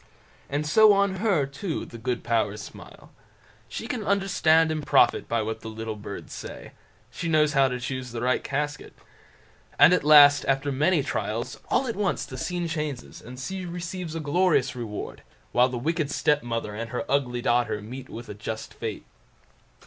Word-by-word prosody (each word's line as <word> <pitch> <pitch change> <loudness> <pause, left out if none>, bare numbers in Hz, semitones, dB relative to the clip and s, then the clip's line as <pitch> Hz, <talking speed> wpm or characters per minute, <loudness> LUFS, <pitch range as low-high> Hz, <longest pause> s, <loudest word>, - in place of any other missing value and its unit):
And 145 +2 -1
so 215 +7 +6
on 200 -1 +1
her, 190 -8 +2
too, 140 +5 -4
the 115 - -11
good 120 +2 -2
powers 110 -3 0
smile. - - -12 0.6
She - - -5
can 225 -1 -3
understand 180 -5 +3
and 155 -1 -2
profit 145 -1 +3
by 115 -1 +1
what 110 +1 -4
the - - -8
little 110 0 -5
birds 100 -1 -8
say; - - -8 0.4
she 145 +8 -5
knows 150 -2 +3
how 135 -1 +4
to 125 -1 -3
choose 125 0 -5
the 115 -1 -5
right 125 +1 +1
casket. 145 +1 -3 0.8
And - - +7
at - - +2
last, 145 -1 +8
after 135 +1 +1
many 150 +3 +2
trials, 115 -1 -3
all 270 - +2
at 230 - -3
once 200 -2 -1
the 130 -1 -9
scene 175 +3 -2
changes, 150 -5 -5
and 125 +2 -10
she 190 +8 -5
receives 175 -1 -5
a - - -2
glorious 150 -4 +2
reward, 115 -4 -6 0.3
while 125 +1 +4
the 125 - -4
wicked 155 +3 -1
stepmother 120 -8 0
and 115 +2 -5
her 125 - -3
ugly 125 -3 0
daughter 120 -4 +1
meet 125 +5 -9
with 115 +1 -8
a - - -6
just 110 +2 -6
fate. 110 -3 -6
140 Hz, 180 wpm, -26 LUFS, 120-165 Hz, 0.8 s, last